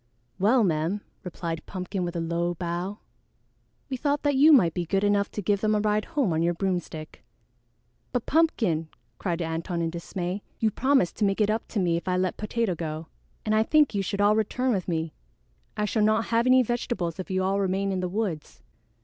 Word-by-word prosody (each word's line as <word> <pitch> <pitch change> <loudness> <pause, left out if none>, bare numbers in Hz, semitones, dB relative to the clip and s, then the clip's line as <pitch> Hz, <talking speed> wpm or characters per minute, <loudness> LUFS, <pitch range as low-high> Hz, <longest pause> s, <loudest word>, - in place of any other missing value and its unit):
"Well, 225 +5 +4
ma'am," 170 +3 0 0.2
replied 165 -2 -5
Pumpkin 185 0 -4
with 175 0 -4
a - - -1
low 170 +1 -1
bow, 175 +3 -3 0.9
"we 265 - -3
thought 285 +2 0
that 290 -1 +2
you 285 +4 +6
might 180 - +6
be 175 - -1
good 195 +4 0
enough 205 0 +2
to 210 - -5
give 200 +2 +1
them 215 0 +2
a - - +2
ride 210 0 +1
home 280 - 0
on 160 - +1
your 170 +1 +1
broomstick." 175 -4 -4 0.9
"But 245 -3 -1
Pumpkin!" 220 - +1 0.3
cried 175 -2 -1
Antone 165 +1 -2
in 165 - -1
dismay, 175 +3 -4 0.2
"you 220 -1 +1
promised 260 -7 +2
to 220 - 0
make 195 +1 0
it 210 0 +3
up 220 +1 -2
to 215 - -2
me 170 -3 +2
if 170 - -7
I 180 0 +1
let 185 -1 0
Potato 215 -1 -1
go, 160 -1 -5 0.4
and 215 - +1
I 215 - +4
think 295 +3 +3
you 200 - 0
should 200 +1 -2
all 205 +1 +5
return 250 +4 0
with 190 -6 -1
me. 160 -2 -2 0.6
I 210 - +1
shall 215 +1 0
not 215 +1 +3
have 230 +2 +3
any 255 0 +6
vegetables 215 -8 -2
if 185 - -5
you 185 0 0
all 195 +1 +1
remain 195 0 0
in 190 - -1
the 180 0 -2
woods." 185 -6 -4
195 Hz, 210 wpm, -26 LUFS, 175-220 Hz, 0.9 s, you